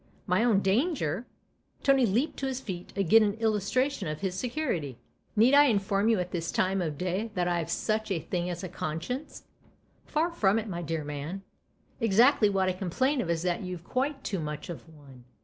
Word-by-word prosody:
"My 180 +5 +2
own 215 -5 +3
Manger'?" 225 - 0 0.6
Tony 270 -3 +4
leaped 235 +10 0
to 270 - -1
his 260 -1 -2
feet 185 -8 -7
again 200 +3 +5
in 205 -1 +2
illustration 225 +2 0
of 150 0 -4
his 190 -2 -1
security. 190 - -2 0.2
" - - -41
Need 230 +5 +5
I 290 +1 +8
inform 200 -3 +2
you 225 -4 +3
at 180 0 -3
this 170 -2 -2
time 190 +1 +1
of 155 -4 -3
day 185 +6 -2
that 175 -1 +1
I've 170 -2 -1
such 215 +5 -1
a 190 - 0
thing 175 +2 -3
as 175 +1 -5
a - - -3
conscience? 175 - -5 0.3
" - - -38
"Far 325 +3 0
from 210 - +2
it, 225 0 -2
my 175 -4 -4
dear 165 -2 -3
man. 150 +6 -5 0.6
Exactly 230 +1 +5
what 190 -1 +1
I 185 - +1
complain 250 - 0
of 175 - -4
is 170 0 0
that 180 -1 0
you've 180 -3 -6
quite 270 - -2
too 195 - -2
much 150 0 -5
of 165 0 -10
one." 140 -5 -16
195 Hz, 200 wpm, -28 LUFS, 175-235 Hz, 0.6 s, I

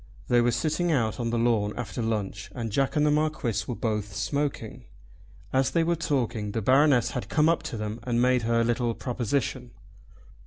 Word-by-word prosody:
They 120 -1 +5
were 120 - +3
sitting 155 +8 0
out 115 -7 0
on 115 -1 -1
the 120 - 0
lawn 115 -3 +1
after 125 0 -4
lunch 110 -2 -3
and 115 -3 -4
Jack 135 +7 0
and 150 0 +3
the 150 - +3
Marquis 150 -5 0
were 125 - -3
both 105 -3 -3
smoking. 125 -1 -3 0.7
As 135 0 +3
they 165 - +1
were 170 +1 +1
talking 120 -9 -1
the 115 - -1
Baroness 130 -1 +4
had 125 - -5
come 155 0 +3
up 165 - +2
to 115 - -5
them 105 +1 -4
and 120 0 -1
made 125 0 +3
her 115 +1 +2
little 120 0 0
proposition. 125 0 -2
120 Hz, 190 wpm, -27 LUFS, 115-140 Hz, 0.7 s, They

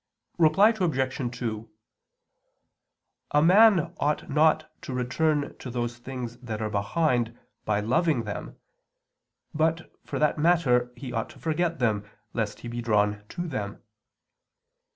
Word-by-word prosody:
Reply 165 +6 +6
Obj. 130 - -1
2: 115 -2 -4 1.6
A 150 - +3
man 195 0 +6
ought 150 +1 0
not 155 +1 +3
to 130 - -5
return 145 +4 0
to 130 - -7
those 120 0 -3
things 120 -2 -6
that 115 -4 -6
are 110 -1 -2
behind, 120 +2 0 0.3
by 105 -1 +1
loving 140 +3 +1
them; 105 -2 -6 1.0
but, 160 +2 0
for - - -5
that 150 0 +1
matter, 140 -7 +3
he 125 -1 -7
ought 115 -1 -2
to - - -15
forget 165 +1 0
them, 110 -5 +1 0.3
lest 110 -3 -3
he - - -7
be 120 0 -4
drawn 105 -2 +1
to 175 0 -4
them. 105 -8 -5
125 Hz, 130 wpm, -27 LUFS, 115-160 Hz, 1.6 s, Reply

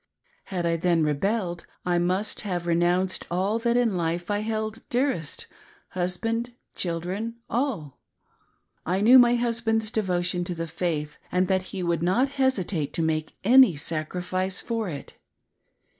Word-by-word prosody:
Had 180 -3 -3
I 165 0 +1
then 170 -1 +2
rebelled, 175 +4 -1 0.2
I 175 -1 +2
must 185 +4 -1
have 180 -4 -3
renounced, 175 +2 +1
all 195 +6 0
that 235 +1 +1
in 235 -5 +2
life 175 +2 -1
I 205 - +1
held 220 +1 -3
dearest 245 - -1 0.2
— - - -28
husband, 225 +7 -2 0.2
children, 185 +7 -3 0.2
all. 230 - -2 0.8
I 185 +3 0
knew 245 +5 +8
my 240 0 +6
husband's 230 -2 0
devotion 180 -5 0
to 175 - -4
the 165 0 -3
faith 160 -2 -3
and 180 0 +2
that 190 -1 +1
he 190 -2 -4
would 170 -2 0
not 195 +11 +2
hesitate 190 - 0
to 165 - 0
make 155 -1 -1
any 250 - +7
sacrifice 180 +5 -2
for 225 -4 -2
it. 145 -4 -8
185 Hz, 145 wpm, -26 LUFS, 170-225 Hz, 0.8 s, knew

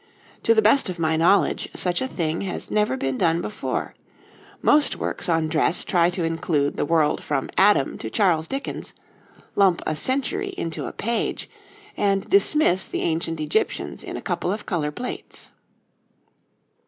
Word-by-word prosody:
To 230 - +3
the 220 - +4
best 220 +2 +4
of 180 - -5
my 160 -1 +1
knowledge, 170 +5 +2
such 180 -1 0
a 260 - -1
thing 165 -8 -2
has 190 -2 -5
never 210 -11 +1
been 135 -1 -2
done 165 -1 +2
before; 210 +4 -4 0.7
most 295 0 +4
works - - -2
on 165 -1 +2
dress 160 +2 +1
try 175 -2 +3
to 180 -1 -3
include 165 -3 0
the - - -1
world 160 -3 +2
from 140 -3 -2
Adam 195 -8 +3
to 110 - -5
Charles 165 - +2
Dickens, 275 +1 -5 0.6
lump 190 -4 +4
a 155 - -1
century 260 - -1
into 165 -1 -3
a - - -5
page, 230 +2 -2 0.5
and 195 -1 0
dismiss 300 - +3
the - - -3
ancient 165 0 -1
Egyptians 155 +8 -1
in - - -6
a - - -8
couple 180 - -2
of 210 +2 -4
colour 160 -6 -1
plates. 245 +12 -7
175 Hz, 160 wpm, -23 LUFS, 160-210 Hz, 0.7 s, the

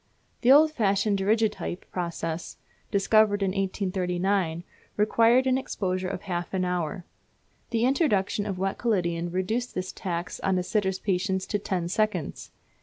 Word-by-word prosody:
The 250 - +5
old 305 +3 +7
fashioned 200 -5 +1
Daguerreotype 210 -2 0
process, 170 -2 -4 0.3
discovered 205 0 +3
in 195 - +1
1839, 185 -2 -1 0.3
required 230 +4 +4
an 260 0 +2
exposure 185 -7 -2
of 185 0 -5
half 175 -1 -3
an 185 -1 +1
hour. 180 0 -2 0.6
The 230 0 +1
introduction 210 - +1
of 195 -3 -3
wet 195 +1 -2
collodion 175 -7 0
reduced 200 +8 -2
this 185 0 -3
tax 175 -1 -4
on 190 -1 +1
a 180 - 0
sitter's 190 -1 0
patience 190 0 -1
to 205 - -1
ten 185 -4 -2
seconds. 215 +4 -1
195 Hz, 140 wpm, -27 LUFS, 180-215 Hz, 0.6 s, old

